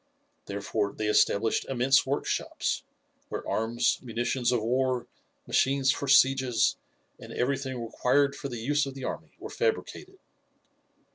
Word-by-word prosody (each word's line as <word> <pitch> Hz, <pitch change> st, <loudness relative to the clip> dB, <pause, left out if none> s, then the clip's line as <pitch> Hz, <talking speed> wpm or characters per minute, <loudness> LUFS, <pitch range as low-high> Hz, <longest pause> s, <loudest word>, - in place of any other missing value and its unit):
Therefore 100 Hz, +1 st, -2 dB
they 110 Hz, -, -2 dB
established 105 Hz, +1 st, +2 dB
immense 135 Hz, +1 st, +2 dB
workshops, 140 Hz, +2 st, -1 dB, 0.5 s
where -, -, -5 dB
arms, 115 Hz, +2 st, +1 dB
munitions 120 Hz, +1 st, -1 dB
of 125 Hz, -, +2 dB
war, 125 Hz, +1 st, 0 dB, 0.4 s
machines 135 Hz, 0 st, +2 dB
for 140 Hz, -, -3 dB
sieges, 130 Hz, -4 st, +4 dB, 0.4 s
and -, -, -11 dB
everything 130 Hz, 0 st, -2 dB
required 135 Hz, +4 st, +1 dB
for 140 Hz, -, -6 dB
the 120 Hz, -, -5 dB
use 145 Hz, +5 st, 0 dB
of 135 Hz, -, -7 dB
the 135 Hz, -, -8 dB
army -, -, -5 dB
were -, -, -9 dB
fabricated. 445 Hz, -4 st, -2 dB
130 Hz, 130 wpm, -28 LUFS, 115-135 Hz, 0.5 s, sieges